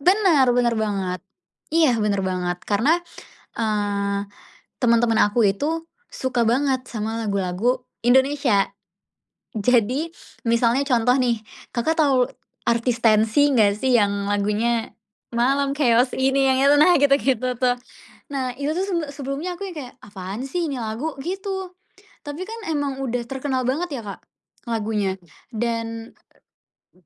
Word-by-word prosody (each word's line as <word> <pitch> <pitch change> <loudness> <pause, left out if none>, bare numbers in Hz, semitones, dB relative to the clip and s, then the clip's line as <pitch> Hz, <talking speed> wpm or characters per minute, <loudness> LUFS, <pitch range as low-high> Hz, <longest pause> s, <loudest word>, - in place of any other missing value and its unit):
bener, 355 -6 +4
bener 240 -1 +3
banget. 195 -4 -2 0.5
Iya 310 -8 +4
bener 205 -2 +1
banget 180 -1 -2
karena, 240 +11 +3 0.6
eee, 205 -2 -1 0.6
temen-temen 235 -1 +3
aku 210 +1 +3
itu 320 +11 -1 0.2
suka 255 -2 -1
banget 260 +1 +1
sama 220 0 -3
lagu-lagu 200 +5 0 0.2
Indonesia. 260 -4 +3 0.9
Jadi 250 +8 +1 0.4
misalnya 235 +3 +3
contoh 245 -2 +3
nih 235 -3 +1 0.3
kakak 315 +8 0
tau 265 -4 +3 0.4
artis 235 0 +1
Tenxi 225 +6 +4
nggak 210 -5 +4
sih 260 +1 +1
yang 200 -1 0
lagunya, 210 +3 0 0.4
"Malam 275 +3 +2
chaos 250 -3 +3
ini" 270 +1 +2
yang 260 0 +3
itu 285 +1 +6
nah 355 - +7
gitu 280 -1 +5
gitu 255 -1 0
tuh. 250 -1 +2 0.6
Nah 260 -2 -2
itu 285 +2 -2
tuh 380 - 0
sebele 335 -6 -2
sebelumnya 285 +6 -4
aku 395 - -4
yang 345 - -9
kayak, 255 -4 -7
"Apaan 200 +4 -6
sih 345 +3 -1
ini - - -3
lagu?' 230 +8 -3
Gitu, 380 +2 -4 0.5
tapi 295 +5 -5
kan 455 +1 -6
emang 285 -2 -1
udah 245 -1 -2
terkenal 265 -1 -2
banget 290 -1 -2
ya, - - -10
Kak, 200 - -7 0.5
lagunya 210 -4 -1 0.4
dan, 230 0 -3 0.8
eee 180 -2 -29
245 Hz, 135 wpm, -22 LUFS, 215-280 Hz, 0.9 s, nah